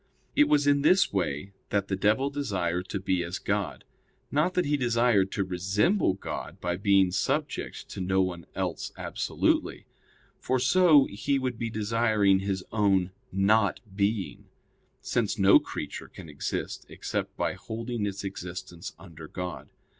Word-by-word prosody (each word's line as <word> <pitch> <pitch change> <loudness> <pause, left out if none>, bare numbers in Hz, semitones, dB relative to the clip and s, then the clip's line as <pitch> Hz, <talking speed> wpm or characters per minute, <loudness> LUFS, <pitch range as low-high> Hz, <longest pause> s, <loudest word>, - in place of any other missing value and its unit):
It 295 - +5
was 145 -1 +4
in 145 0 +4
this 185 - +4
way 90 0 -2 0.2
that 100 -1 0
the 95 - -1
devil 105 +8 +2
desired 90 -10 -2
to 100 - -2
be 95 -1 0
as 85 +1 -4
God. - - -2 0.5
Not 155 +5 +1
that 180 - +2
he 145 +1 +2
desired 120 -6 +2
to 100 - 0
resemble 95 - +1
God 100 - -6
by 90 0 -1
being 95 -1 +4
subject 140 - -2
to - - -6
no 95 +1 +1
one 90 -3 -1
else - - -3
absolutely; - - -1 0.5
for 130 - 0
so 145 +2 +5
he 135 +8 -1
would 130 -3 -2
be 115 - -2
desiring 110 -2 +2
his 95 -1 -2
own 95 -4 +2 0.2
'not 100 +2 +3 0.2
being'; 100 0 -1 0.5
since - - 0
no - - +7
creature - - -6
can - - -11
exist 70 - -4
except - - -4
by - - 0
holding 115 -1 -4
its 100 0 -5
existence 90 -2 -6
under 80 -2 -11
God. 90 +2 -6
100 Hz, 150 wpm, -28 LUFS, 95-125 Hz, 0.5 s, no